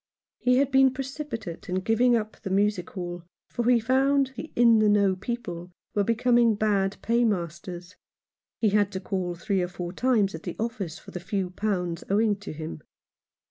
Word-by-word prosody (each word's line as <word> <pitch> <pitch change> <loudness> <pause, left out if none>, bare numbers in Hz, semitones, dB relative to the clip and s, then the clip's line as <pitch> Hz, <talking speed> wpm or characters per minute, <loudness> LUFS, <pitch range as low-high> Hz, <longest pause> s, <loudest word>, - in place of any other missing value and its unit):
He 250 0 +3
had 275 0 +2
been 265 0 +5
pre 270 - -2
cipitate 250 - -6
in 180 - -1
giving 235 +4 +3
up 215 -2 -3
the 195 - -5
music 195 -1 +1
hall, 175 -2 -6 0.3
for 240 0 0
he 245 -1 +5
found 265 +3 +2
the 315 - -7
In 230 -2 +6
the 215 -1 +4
Know 200 -2 +3
people 185 -5 -5 0.2
were 205 - +2
becoming 235 +1 +3
bad 200 -2 +1
paymasters. 180 -6 -1 0.6
He 220 - +2
had 205 0 +2
to 190 - -2
call 185 -2 -3
three 185 +2 -1
or 180 - 0
four 175 0 -6
times 220 -3 +2
at 160 - -6
the 175 - -6
office 210 -7 -3
for - - -13
the 180 - -5
few 185 0 -3
pounds 180 -4 -2
owing 210 +1 +3
to 205 - -8
him. 155 0 -7
205 Hz, 180 wpm, -26 LUFS, 180-235 Hz, 0.6 s, In